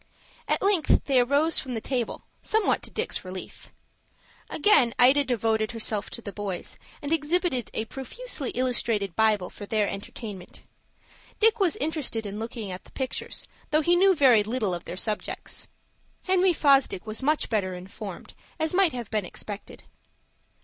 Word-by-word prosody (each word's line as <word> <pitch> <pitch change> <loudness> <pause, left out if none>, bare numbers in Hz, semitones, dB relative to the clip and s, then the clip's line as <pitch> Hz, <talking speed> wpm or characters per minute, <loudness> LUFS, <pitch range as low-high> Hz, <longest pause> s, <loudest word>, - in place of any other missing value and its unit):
At - - +1
length 390 -6 +3
they 270 -3 +4
arose 285 +6 +3
from 255 -2 -4
the - - -1
table, 245 0 -2 0.2
somewhat 440 -1 +1
to - - -8
Dick's - - -2
relief. 185 0 -9 0.8
Again 290 - +4
Ida 265 +4 +6
devoted 225 -3 0
herself 215 -2 -1
to 235 - -7
the 200 - -6
boys, 200 -4 -5 0.3
and 290 +2 0
exhibited 320 - 0
a 220 - -1
profusely 275 - -3
illustrated 230 -6 0
Bible 215 -4 +2
for 205 - -9
their 215 -1 +1
entertainment. 195 -1 -7 0.8
Dick 450 +1 +4
was 370 -5 +2
interested 285 -7 -2
in 205 +1 -5
looking 225 -3 -5
at 180 - -7
the - - -18
pictures, 265 -2 -4 0.2
though 310 +1 +3
he 345 +3 +3
knew 380 +1 +5
very 260 -8 +6
little 215 -2 -1
of 175 0 -5
their 180 - -6
subjects. 210 +1 -3 0.6
Henry 370 0 +3
Fosdick 275 - +3
was 220 +2 -4
much 300 +3 +2
better 190 -5 -1
informed, 190 +1 -8 0.3
as 315 +1 0
might 370 -4 +4
have 240 -4 -6
been 215 -2 0
expected. 205 +3 -7
245 Hz, 155 wpm, -26 LUFS, 210-305 Hz, 0.8 s, Ida